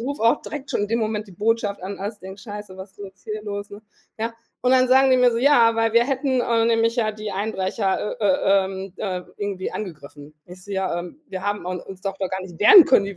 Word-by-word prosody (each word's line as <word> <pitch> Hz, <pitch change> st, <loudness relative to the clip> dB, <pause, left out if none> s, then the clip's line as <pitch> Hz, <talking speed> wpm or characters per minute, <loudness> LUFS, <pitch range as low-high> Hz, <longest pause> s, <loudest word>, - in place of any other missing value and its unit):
rufe 275 Hz, +1 st, -4 dB
auch 230 Hz, +5 st, +3 dB
direkt 290 Hz, -2 st, -7 dB
schon -, -, 0 dB
in 205 Hz, -, -2 dB
dem 230 Hz, +1 st, 0 dB
Moment 215 Hz, -1 st, -2 dB
die -, -, -13 dB
Botschaft 205 Hz, 0 st, -1 dB
an, 195 Hz, +2 st, -6 dB
als 205 Hz, +2 st, -5 dB
denke: 190 Hz, +2 st, -10 dB
„Scheiße, 205 Hz, -3 st, -9 dB
was 190 Hz, +1 st, -9 dB
ist 195 Hz, -, -34 dB
denn 205 Hz, -, -7 dB
jetzt 190 Hz, 0 st, -18 dB
hier 215 Hz, 0 st, -5 dB
los, 205 Hz, -1 st, -6 dB
ne?“ 205 Hz, +1 st, -10 dB, 0.4 s
Ja. 230 Hz, +1 st, -3 dB, 0.3 s
Und 250 Hz, +1 st, +3 dB
dann 255 Hz, -1 st, +4 dB
sagen 265 Hz, +1 st, +5 dB
die 255 Hz, -, +5 dB
mir 250 Hz, -1 st, +5 dB
so, 230 Hz, -, -1 dB
ja, 240 Hz, -4 st, +5 dB
weil 225 Hz, -1 st, +1 dB
wir 235 Hz, -, +5 dB
hätten, 265 Hz, -1 st, 0 dB
äh, 230 Hz, -1 st, +2 dB
nämlich 230 Hz, 0 st, +2 dB
ja 215 Hz, -2 st, +1 dB
die 215 Hz, 0 st, -6 dB
Einbrecher, 200 Hz, +2 st, -2 dB
äh, 210 Hz, -, -1 dB
äh, 195 Hz, 0 st, +3 dB
ähm, 190 Hz, 0 st, -6 dB
äh, 185 Hz, -4 st, -3 dB, 0.2 s
irgendwie 200 Hz, -2 st, -4 dB
angegriffen. 150 Hz, -5 st, -8 dB
Ich 180 Hz, +1 st, -13 dB
so: 205 Hz, -, -8 dB
„Ja, 190 Hz, -3 st, -1 dB
ähm, 180 Hz, -, -10 dB
wir 190 Hz, -1 st, -6 dB
haben 205 Hz, -2 st, -2 dB
un 180 Hz, -1 st, -3 dB
uns 190 Hz, -1 st, -11 dB
doch 195 Hz, 0 st, -4 dB
doch 190 Hz, -2 st, -2 dB
gar 190 Hz, 0 st, -3 dB
nicht 175 Hz, -3 st, -11 dB
wehren 360 Hz, -, +9 dB
können, 200 Hz, -8 st, +4 dB
die 200 Hz, -2 st, -7 dB
205 Hz, 260 wpm, -22 LUFS, 190-230 Hz, 0.4 s, wehren